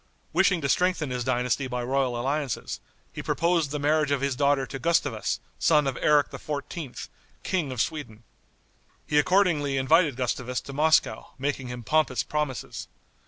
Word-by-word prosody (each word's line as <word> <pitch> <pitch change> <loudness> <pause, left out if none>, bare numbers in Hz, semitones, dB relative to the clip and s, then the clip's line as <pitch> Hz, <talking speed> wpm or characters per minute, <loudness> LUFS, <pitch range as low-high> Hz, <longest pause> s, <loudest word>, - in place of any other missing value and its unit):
Wishing 185 -3 +3
to 140 - 0
strengthen 180 -2 +1
his 125 -1 -2
dynasty 125 +2 0
by 125 -1 -3
royal 130 -1 0
alliances, 135 0 -2 0.3
he - - -5
proposed 170 -2 +1
the 150 - -3
marriage 150 +1 +2
of 140 -1 +1
his 140 -2 0
daughter 140 0 +2
to 135 - -7
Gustavus, 170 +2 0 0.2
son 150 -3 +4
of 135 -2 -1
Eric 150 -1 +4
XIV., 145 -1 -6 0.4
King 170 -8 -1
of 125 - -5
Sweden. 120 -7 -3 0.8
He 150 - +3
accordingly 150 -4 +2
invited 150 +2 +3
Gustavus 125 0 -2
to 140 - -9
Moscow, 155 +3 +2
making 135 -1 -2
him 125 -1 -6
pompous 155 +5 +1
promises. 150 -5 -3
140 Hz, 155 wpm, -26 LUFS, 130-155 Hz, 0.8 s, son